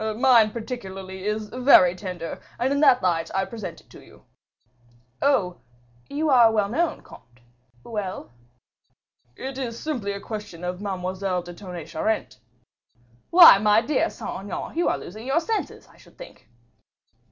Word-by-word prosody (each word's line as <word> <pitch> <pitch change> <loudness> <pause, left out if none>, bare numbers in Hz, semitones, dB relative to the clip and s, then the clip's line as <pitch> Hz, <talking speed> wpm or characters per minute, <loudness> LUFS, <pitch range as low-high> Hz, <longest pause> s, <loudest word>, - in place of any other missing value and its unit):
"Mine 235 -3 +5
particularly 195 -5 -7
is 210 0 -2
very 250 -9 +5
tender, 180 -3 -6 0.2
and 260 +3 0
in 280 - 0
that 255 -4 +5
light 165 -2 0
I 190 0 +1
present 195 -7 -8
it - - -31
to - - -14
you." - - -19 1.0
"Oh! 200 -11 +1 0.5
you 300 +3 -2
are 240 -4 +6
well 210 -2 0
known, 330 +9 -1
comte. 120 +1 -17 0.4
Well?" 205 - -6 1.0
"It 265 - -6
is 235 -3 -5
simply 240 -10 -3
a 200 - -6
question 205 -5 -8
of 180 +1 -4
Mademoiselle 185 -1 -3
de 175 0 -10
Tonnay 175 -3 -8
Charente." 215 -2 -2 0.9
"Why, 335 - +9
my 210 +1 +4
dear 290 +2 0
Saint - - -7
Aignan, 200 +9 -6
you 345 - +1
are - - 0
losing 215 +7 -10
your 275 +5 +2
senses, 435 +6 -4
I - - -22
should - - -21
think." - - -14
210 Hz, 150 wpm, -24 LUFS, 185-255 Hz, 1.0 s, Why